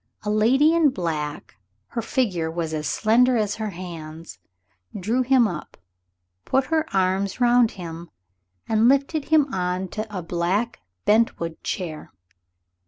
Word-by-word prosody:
A 210 - -1
lady 260 +9 +4
in 330 -3 +4
black 155 - -4 0.3
her 230 - -3
figure 205 - -1
was 165 -1 -3
as 150 -1 -2
slender 240 +3 +3
as 210 -2 -1
her 215 -1 -3
hands 165 - -9 0.6
drew 225 +7 0
him 255 -2 +4
up, 170 -6 -7 0.7
put 270 - +1
her 315 0 +2
arms 190 +2 0
round 240 -1 +4
him, 170 -1 -7 0.6
and 220 +2 +4
lifted 280 +2 +1
him 300 -4 +3
on 180 0 -2
to 215 +3 -4
a 190 -4 -5
black 180 +8 -1 0.3
bentwood 210 -7 +1
chair. 160 -5 -5
205 Hz, 135 wpm, -23 LUFS, 170-245 Hz, 0.7 s, lady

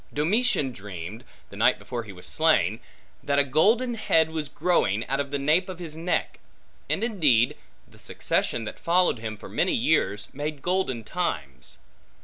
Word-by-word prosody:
Domitian 165 - +1
dreamed, 100 0 -8 0.3
the - - -10
night - - +3
before 120 - -5
he 105 - -9
was 90 -2 -10
slain, 115 - +2 0.4
that 140 0 0
a 140 - +5
golden 220 - +3
head 160 -8 +2
was 155 -3 -3
growing, 130 - +1
out 135 +2 -1
of 140 0 -2
the 140 - -1
nape 155 +7 +2
of 185 - -6
his 165 -3 -7
neck: 170 +2 -2 0.5
and 205 - 0
indeed, 150 - +3 0.3
the - - -19
succession 115 - 0
that - - -7
followed 175 -7 +2
him 110 -1 -5
for - - -10
many - - +1
years, 105 +1 +1
made 145 0 -5
golden 180 -11 0
times. 85 - -4
145 Hz, 165 wpm, -26 LUFS, 115-175 Hz, 0.5 s, a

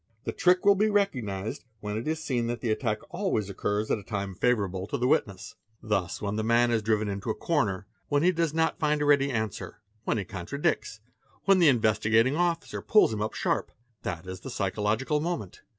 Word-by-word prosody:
The - - -2
trick 180 +2 +3
will 200 - +8
be 205 +2 +2
recogniz 120 - -1 0.2
when 105 -1 -4
it 110 +5 -4
is 160 0 -1
seen 120 -5 -1
that 120 0 -3
the 115 -1 -1
attack 110 -1 -1
always 170 - -1
occurs 105 +2 -1
at - - +1
a - - -12
time 100 -2 -4
favourable 100 -4 0
to - - -2
t - - -9
SHAMMING 125 +1 +2
ILLNESS 100 -2 -11 0.3
315 110 - -13
witness. 100 -2 +4 0.2
'Thus - - -17
when 100 0 -1
the 110 - 0
man 120 +2 +3
is 115 -2 +2
driven 110 0 +1
into 100 +2 -4
a 110 - 0
corner, 105 - 0 0.2
when 145 +1 +1
he 180 - +5
does 165 -3 0
not 160 +1 0
find 150 -1 +1
a - - +1
ready 140 -1 +4
answer, 110 -7 -4 0.3
when - - +1
he 100 - -3
contradicts, 100 +3 -2 0.4
when 195 -1 +5
the 170 - +6
Investigating 110 0 +3
Officer 170 0 -1
pulls 210 - +4
him 105 - -3
up 110 - -2
sharp, - - -1 0.3
that 85 -1 -5
is 95 0 -7
the - - -8
psychological 110 +7 0
moment. 155 - -4
115 Hz, 215 wpm, -28 LUFS, 105-150 Hz, 0.4 s, will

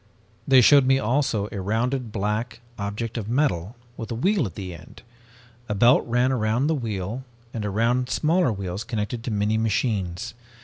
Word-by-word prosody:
"They 130 -1 +7
showed 140 +2 +6
me 135 0 +5
also 120 -4 0
a 100 - -4
rounded 115 +4 -1
black 110 +3 -2 0.2
object 105 +4 -3
of 110 -1 -6
metal 115 - 0 0.2
with 115 - -6
a 115 - -3
wheel 180 - +1
at 90 - -11
the 95 -2 -6
end. 85 - -13 0.7
A 105 - -1
belt 120 +6 +5
ran 125 +2 +2
around 120 +1 +1
the 160 - +2
wheel 110 - -3 0.3
and 110 - -3
around 115 +5 0
smaller 160 -2 +2
wheels 100 0 -4
connected 115 0 -3
to - - -2
many 105 0 0
machines. 110 -1 -1
115 Hz, 170 wpm, -24 LUFS, 105-125 Hz, 0.7 s, They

